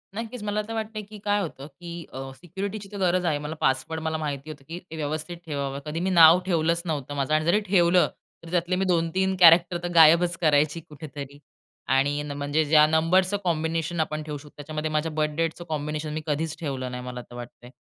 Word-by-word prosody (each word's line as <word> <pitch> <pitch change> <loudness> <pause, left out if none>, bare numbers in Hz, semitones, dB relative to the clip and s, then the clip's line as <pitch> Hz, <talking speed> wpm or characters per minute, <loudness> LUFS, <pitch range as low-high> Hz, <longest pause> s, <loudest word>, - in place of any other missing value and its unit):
नक्कीच, 230 +1 -5
मला 210 0 -1
तर 225 - -5
वाटतंय 220 -1 -4
की 210 +1 -12
काय 205 0 +2
होतं 145 -6 -6
की 170 +3 -11 0.2
अ, 130 - -6 0.2
सिक्युरिटीची 195 +5 -6
तर 205 - -7
गरज 180 -1 +1
आहे. 155 -4 +1
मला 150 +2 -5
पासवर्ड 135 +5 0
मला 160 0 -2
माहिती 150 -1 -4
होतं 145 -3 -9
की 165 +2 -6
ते 180 -3 -12
व्य 155 - -4
व्यवस्थित 155 +3 -4
ठेवावं. 140 -3 -3
कधी 155 +2 -3
मी 185 +2 0
नाव 170 -1 +8
ठेवलंच 170 -1 +1
नव्हतं 145 -3 -3
माझं 140 +2 -1
आणि 155 0 +2
जरी 175 +6 +4
ठेवलं, 180 -1 +4 0.4
तर 165 - -10
त्यातले 175 +1 +1
मी 190 +1 0
2-3 185 +2 +1
कॅरेक्टर 175 0 +7
तर - - -1
गायबच 170 +2 +6
करायची 150 0 +3
कुठेतरी. 145 -2 -9 0.5
आणि 140 +2 +2
न 150 - -6
म्हणजे 145 +2 +1
ज्या 150 0 +6
नंबरच 175 +5 +2
कॉम्बिनेशन 165 0 -1
आपण 155 -1 -1
ठेवू 150 -1 -5
शकतो. 150 +1 -14
त्याच्यामध्ये 155 +1 -4
माझ्या 155 +1 0
बर्थडेटच 155 +2 -1
कॉम्बिनेशन 150 0 -3
मी 155 - -3
कधीच 155 +1 -1
ठेवलं 130 -5 -4
नाही 125 0 -6
मला 125 -1 -6
तर 120 - -14
वाटतंय. 120 0 -10
160 Hz, 205 wpm, -25 LUFS, 150-175 Hz, 0.5 s, नाव